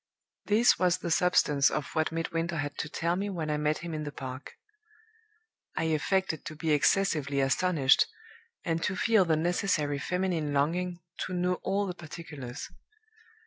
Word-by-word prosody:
This 220 Hz, +4 st, +4 dB
was 180 Hz, -1 st, +3 dB
the 170 Hz, -2 st, -4 dB
substance 150 Hz, -5 st, +4 dB
of 150 Hz, -, -3 dB
what 160 Hz, 0 st, +1 dB
Midwinter 165 Hz, +1 st, -2 dB
had 145 Hz, -1 st, -3 dB
to 150 Hz, -, -3 dB
tell 170 Hz, +3 st, -1 dB
me 200 Hz, +2 st, -2 dB
when 165 Hz, -5 st, -3 dB
I 150 Hz, -, 0 dB
met 150 Hz, +1 st, +1 dB
him 170 Hz, -, -5 dB
in 155 Hz, -1 st, -3 dB
the 145 Hz, -, -5 dB
Park. 130 Hz, -1 st, -7 dB, 1.2 s
I -, -, +1 dB
affected 160 Hz, +1 st, 0 dB
to 155 Hz, -, -6 dB
be 160 Hz, 0 st, -1 dB
excessively 150 Hz, -2 st, +2 dB
astonished, 135 Hz, +1 st, +3 dB, 0.6 s
and 165 Hz, -2 st, 0 dB
to 185 Hz, -, -1 dB
feel 220 Hz, -2 st, +3 dB
the 160 Hz, -2 st, +2 dB
necessary 155 Hz, -3 st, 0 dB
feminine 180 Hz, -4 st, -1 dB
longing 175 Hz, +5 st, 0 dB, 0.3 s
to 185 Hz, -, -6 dB
know 180 Hz, 0 st, 0 dB
all 200 Hz, +1 st, 0 dB
the 185 Hz, -, -3 dB
particulars. 150 Hz, -6 st, -8 dB
165 Hz, 160 wpm, -29 LUFS, 150-180 Hz, 1.2 s, This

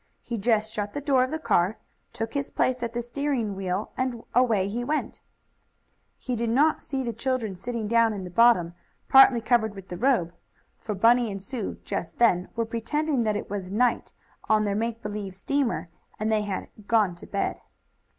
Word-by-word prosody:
He 235 Hz, -2 st, -4 dB
just 220 Hz, 0 st, +1 dB
shut 205 Hz, -1 st, -3 dB
the 290 Hz, -, -3 dB
door 275 Hz, -3 st, +3 dB
of 255 Hz, -, -2 dB
the 315 Hz, -, -2 dB
car, 195 Hz, -, +1 dB, 0.3 s
took 225 Hz, 0 st, -4 dB
his 280 Hz, -1 st, -2 dB
place 255 Hz, -1 st, 0 dB
at 235 Hz, -1 st, -3 dB
the 240 Hz, 0 st, -2 dB
steering 240 Hz, -4 st, -2 dB
wheel 190 Hz, +1 st, -3 dB
and 255 Hz, -3 st, -2 dB
away 225 Hz, -6 st, +3 dB
he 235 Hz, +4 st, -3 dB
went. 300 Hz, +5 st, -2 dB, 1.0 s
He 250 Hz, -, -3 dB
did 230 Hz, 0 st, -1 dB
not 295 Hz, +7 st, +3 dB
see 270 Hz, -2 st, -3 dB
the 235 Hz, -2 st, -3 dB
children 230 Hz, -3 st, -2 dB
sitting 225 Hz, +3 st, -4 dB
down 230 Hz, 0 st, +4 dB
in 200 Hz, -3 st, -5 dB
the 180 Hz, -, -8 dB
bottom, 180 Hz, -5 st, +4 dB, 0.4 s
partly 265 Hz, -3 st, +7 dB
covered 220 Hz, -3 st, +1 dB
with 195 Hz, -1 st, -11 dB
the 175 Hz, -, -5 dB
robe. 225 Hz, -9 st, +2 dB, 0.5 s
For 210 Hz, -, -4 dB
Bunny 235 Hz, +3 st, +4 dB
and 195 Hz, -1 st, -5 dB
Sue, 220 Hz, +2 st, -5 dB
just 165 Hz, -, -4 dB
then, 185 Hz, -7 st, +3 dB
were 230 Hz, -1 st, 0 dB
pretending 240 Hz, +4 st, -1 dB
that 210 Hz, -1 st, +1 dB
it -, -, -6 dB
was 195 Hz, -2 st, -5 dB
night 240 Hz, +5 st, +1 dB, 0.4 s
on 215 Hz, -1 st, +4 dB
their 205 Hz, -1 st, 0 dB
make 230 Hz, +2 st, -2 dB
believe 205 Hz, -2 st, -5 dB
steamer, 250 Hz, -2 st, -1 dB, 0.3 s
and 215 Hz, +1 st, 0 dB
they 215 Hz, -1 st, +2 dB
had 205 Hz, -2 st, -4 dB, 0.2 s
"gone 215 Hz, -5 st, +3 dB
to -, -, -11 dB
bed." 200 Hz, -, -2 dB
230 Hz, 190 wpm, -26 LUFS, 205-245 Hz, 1.0 s, partly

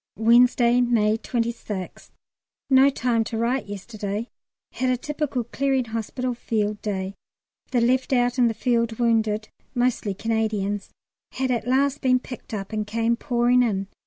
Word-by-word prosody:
Wednesday, 240 Hz, +1 st, +5 dB
May 220 Hz, -3 st, +2 dB
26th. 230 Hz, -5 st, -4 dB, 0.6 s
No 265 Hz, +1 st, +7 dB
time 240 Hz, -4 st, 0 dB
to 225 Hz, -, -4 dB
write 235 Hz, +1 st, 0 dB
yesterday; 205 Hz, +2 st, -5 dB, 0.4 s
had 255 Hz, 0 st, -1 dB
a 250 Hz, -, +2 dB
typical 295 Hz, -2 st, -2 dB
Clearing 265 Hz, +2 st, 0 dB
Hospital 230 Hz, +3 st, -3 dB
Field 215 Hz, -3 st, -2 dB
Day. 195 Hz, -2 st, -3 dB, 0.6 s
The 245 Hz, -, +1 dB
left 255 Hz, +3 st, +2 dB
out 245 Hz, 0 st, +2 dB
in 245 Hz, -, +5 dB
the 225 Hz, -, -1 dB
field 235 Hz, -2 st, +1 dB
wounded 220 Hz, -2 st, +1 dB, 0.3 s
(mostly 245 Hz, -5 st, 0 dB
Canadians) 215 Hz, -2 st, -1 dB, 0.4 s
had 260 Hz, -1 st, -1 dB
at 235 Hz, -1 st, -1 dB
last 275 Hz, +2 st, +2 dB
been 255 Hz, -2 st, +4 dB
picked 250 Hz, 0 st, -9 dB
up 200 Hz, -1 st, -5 dB
and 215 Hz, -1 st, -2 dB
came 230 Hz, +2 st, +1 dB
pouring 245 Hz, 0 st, +2 dB
in. 200 Hz, -5 st, 0 dB
235 Hz, 145 wpm, -24 LUFS, 215-250 Hz, 0.6 s, No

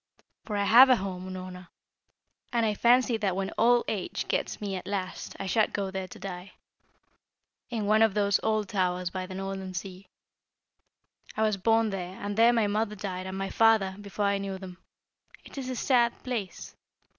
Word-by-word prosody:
For 210 Hz, -2 st, -3 dB
I 200 Hz, -, +1 dB
have 240 Hz, +6 st, +8 dB
a 255 Hz, -, +7 dB
home, 185 Hz, -3 st, -5 dB
Unorna, 185 Hz, -1 st, -8 dB, 0.8 s
and 235 Hz, -2 st, +1 dB
I 215 Hz, -, +1 dB
fancy 240 Hz, +2 st, +3 dB
that 200 Hz, -4 st, -1 dB
when 195 Hz, 0 st, -2 dB
old 240 Hz, +1 st, +4 dB
age 200 Hz, -5 st, -3 dB
gets -, -, -2 dB
me 200 Hz, -2 st, -3 dB
at 185 Hz, -, -7 dB
last 195 Hz, -2 st, -4 dB
I 195 Hz, -, -4 dB
shall 210 Hz, +3 st, +2 dB
go 195 Hz, -2 st, -3 dB
there 190 Hz, -1 st, -4 dB
to -, -, -12 dB
die, 185 Hz, -1 st, -8 dB, 1.2 s
in 225 Hz, -4 st, -2 dB
one 215 Hz, +2 st, +3 dB
of 220 Hz, -3 st, +4 dB
those 200 Hz, -1 st, +2 dB
old 215 Hz, -2 st, 0 dB
towers 180 Hz, -2 st, -1 dB
by 185 Hz, -1 st, -4 dB
the 185 Hz, -, -8 dB
northern 190 Hz, -1 st, -5 dB
sea. 185 Hz, +1 st, -7 dB, 1.3 s
I 220 Hz, -, +2 dB
was 215 Hz, -1 st, +2 dB
born 225 Hz, +2 st, +2 dB
there, 185 Hz, -1 st, -5 dB
and 205 Hz, 0 st, -4 dB
there 230 Hz, +2 st, +6 dB
my 230 Hz, -3 st, +2 dB
mother 210 Hz, +1 st, -1 dB
died 190 Hz, -2 st, -5 dB
and 190 Hz, 0 st, -5 dB
my 195 Hz, 0 st, -3 dB
father, 220 Hz, -4 st, +3 dB
before 205 Hz, 0 st, -3 dB
I 200 Hz, 0 st, +1 dB
knew 195 Hz, -1 st, -4 dB
them; 185 Hz, -1 st, -10 dB, 0.7 s
it -, -, -13 dB
is 260 Hz, -1 st, -5 dB
a 255 Hz, -, -3 dB
sad 240 Hz, -1 st, +1 dB
place! 225 Hz, -8 st, -5 dB
200 Hz, 190 wpm, -28 LUFS, 190-220 Hz, 1.3 s, have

